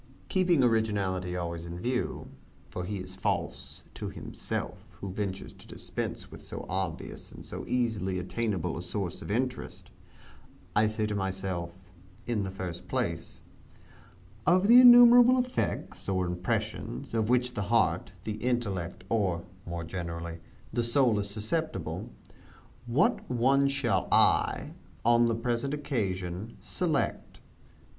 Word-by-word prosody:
Keeping 180 -7 +3
originality 100 -6 +1
always 85 -1 -4
in 85 +1 -6
view 125 +5 -2 0.4
for 90 - -4
he 100 +2 -3
is 95 0 -8
false 95 - -3
to - - -5
himself - - -5 0.2
who 95 - -5
ventures 100 -1 -4
to - - -16
dispense - - -5
with - - -10
so - - -7
obvious - - -4
and - - -11
so - - -7
easily 110 -7 0
attainable 90 -1 -2
a 85 - -4
source 90 0 -4
of - - -8
interest 125 +3 -3 0.8
I 105 +1 +5
say 110 0 -1
to 105 - -2
myself, 95 -3 -3 0.5
in 115 -3 0
the 95 - -2
first 95 -3 -6
place, - - -3 1.1
"Of 185 +3 +5
the 245 +2 +10
innumerable 245 0 +9
effects, 250 - -2
or 95 -1 +1
impressions, 90 - -3
of 110 -1 +1
which 125 0 +2
the 105 - -2
heart, 95 -6 +2
the 105 +1 -3
intellect, 105 -9 -2
or 95 -6 0 0.2
(more 85 -1 -4
generally) 85 -1 -5 0.3
the 120 - +1
soul 120 -2 +3
is 100 0 -3
susceptible, 110 - -3 0.8
what 120 +5 +2
one 135 +3 +3
shall 120 -9 0
I, - - +3 0.3
on 120 0 +5
the 115 - +1
present 120 +4 -1
occasion, 100 - -3
select?" 165 -5 -2
105 Hz, 135 wpm, -29 LUFS, 90-125 Hz, 1.1 s, the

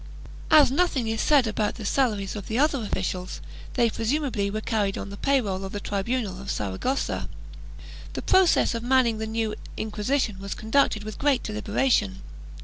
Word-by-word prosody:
As 295 -4 +7
nothing 275 -6 +1
is 225 0 -1
said 285 -4 +4
about 215 -1 -1
the 220 - -7
salaries 210 -5 0
of 205 -3 -6
the 225 - -2
other 285 -1 +2
officials, 185 -3 -3 0.4
they 240 -2 +4
presumably 230 -3 -1
were 215 +2 -2
carried 210 -3 -1
on 200 - -6
the - - -6
pay 275 +6 +2
roll 195 -5 -3
of 190 - -6
the 205 - -3
tribunal 200 -1 -2
of 195 - -8
Saragossa. 105 - -2 0.8
The - - -5
process 375 -8 +4
of 230 - -3
manning 240 -2 +2
the 220 - -3
new 220 -1 -1 0.2
Inquisition 215 0 -1
was 200 0 -5
conducted 220 -1 +1
with 215 0 -7
great 280 -3 +2
deliberation. 210 -2 0
220 Hz, 170 wpm, -25 LUFS, 200-260 Hz, 0.8 s, As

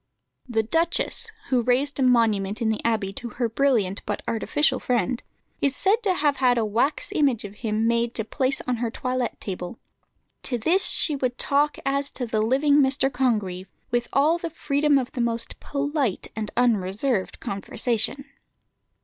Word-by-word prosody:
The 220 -2 +1
duchess, 335 - -1 0.2
who 255 -2 +3
raised 260 +4 +1
a - - +2
monument 220 -5 +2
in 230 -2 +1
the 220 - -2
Abbey 215 -4 0
to 240 +4 -6
her 240 -2 +1
brilliant 225 -5 +1
but - - -3
artificial 260 +4 +1
friend, 250 0 0 0.4
is 280 -1 +2
said 410 +4 +2
to 390 -5 +1
have 290 -3 +1
had 250 -2 +3
a 225 - +1
wax 255 - 0
image 270 - +1
of 200 - -8
him 220 -1 -1
made 235 0 +1
to 220 - -1
place 265 +3 0
on 250 -1 -2
her 235 0 -1
toilette 255 +1 -3
table. 180 +1 -6 0.6
"To 245 - +1
this 340 - +2
she 300 - +2
would 255 -3 -2
talk 290 +1 +1
as 280 +1 +1
to 250 - -3
the 220 -2 0
living 275 +6 +3
Mr. 270 -1 +2
Congreve, 210 -8 -1 0.2
with 240 0 0
all 310 +5 +3
the 335 - -4
freedom 290 -2 +1
of 255 -2 -2
the 245 - -3
most 230 -1 -2
polite 285 - -2
and 215 -1 -3
unreserved 215 -1 +1
conversation." 230 +6 -1
245 Hz, 170 wpm, -24 LUFS, 225-280 Hz, 0.6 s, who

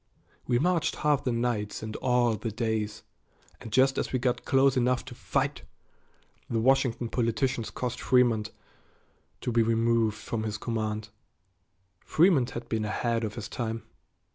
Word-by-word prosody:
We 120 - +3
marched 170 +4 +1
half 150 -2 +1
the 125 - 0
nights 115 -4 -1
and 110 0 -5
all 125 -2 +2
the 115 - -4
days 110 -1 -2 0.6
and 110 - -9
just 130 +3 +3
as - - -2
we 130 - +1
got 125 -1 -1
close 135 0 +4
enough 125 0 +1
to 130 - -9
fight, - - -1 0.9
the 115 - 0
Washington 125 -1 +2
politicians 115 0 0
caused 125 -1 -4
Frémont 120 -4 +3 0.9
to 125 - -2
be 115 0 +3
removed 115 -1 +2
from 110 +1 -4
his 110 -1 -3
command. 110 -1 -3 0.9
Frémont 155 -7 +3
had 120 0 -7
been 110 -2 -1
ahead 115 +2 -1
of 105 -2 -3
his 110 -3 -5
time. 115 -2 -4
115 Hz, 150 wpm, -28 LUFS, 110-125 Hz, 0.9 s, close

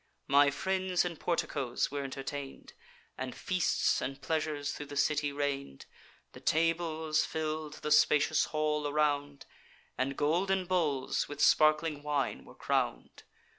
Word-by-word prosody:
My 140 +1 +5
friends 185 +4 0
in 170 -2 -4
porticoes 140 -9 -1
were 140 0 -3
entertain'd, 135 +1 -6 0.5
And 130 -1 -4
feasts 185 -2 +1
and 135 0 -4
pleasures 155 -2 -2
thro' 145 - -7
the 145 - -7
city 145 0 +1
reign'd. 140 - -3 0.5
The - - -12
tables 160 -1 +1
fill'd 155 -1 -3
the 150 - -2
spacious 150 +1 +4
hall 150 -1 -1
around, 145 -1 0 0.5
And 135 +1 -1
golden 185 +5 +1
bowls 160 -8 0
with 145 -1 -7
sparkling 155 0 +4
wine 145 -1 -2
were - - -15
crown'd. - - -2
150 Hz, 130 wpm, -31 LUFS, 140-160 Hz, 0.5 s, My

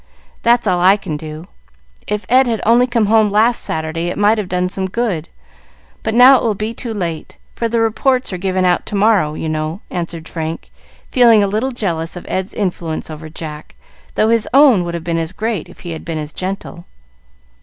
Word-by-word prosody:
That's 240 0 +3
all 180 - +2
I 190 +3 +5
can 190 -6 -5
do. 155 +2 -8 0.6
If 210 0 -2
Ed 255 +1 +4
had 225 -2 0
only 240 +3 +4
come 235 -3 +1
home 215 0 +4
last 220 +4 +2
Saturday 160 +2 -2
it 175 - -3
might 210 +2 +3
have 195 -4 -4
done 180 0 0
some 190 +1 -2
good, 185 -7 -2 0.7
but 220 0 -2
now 255 +2 +8
it - - -3
will 220 -3 +1
be 215 +3 -3
too 230 0 -5
late; 170 -7 -4 0.2
for 230 - -2
the 230 0 0
reports 250 +1 +1
are 180 - -4
given 185 0 0
out 180 -1 +1
to - - -3
morrow, 200 -7 +2
you 160 - -4
know," 155 +4 -3
answered 170 -2 -5
Frank, 160 0 -5 0.4
feeling 230 -4 +6
a - - +1
little 220 +7 -1
jealous 170 -9 -3
of 175 - -8
Ed's 190 +1 -3
influence 170 -5 -3
over 155 +1 -8
Jack, 155 -1 -9 0.4
though 215 - +2
his 230 -1 +2
own 270 -10 +6
would 170 0 -4
have 170 - -5
been 165 0 -1
as 165 +2 -3
great 215 -4 -3
if - - -15
he 175 - -6
had 160 - -6
been 165 -3 -4
as 150 0 -6
gentle. 185 -2 -5
190 Hz, 210 wpm, -17 LUFS, 165-225 Hz, 0.7 s, now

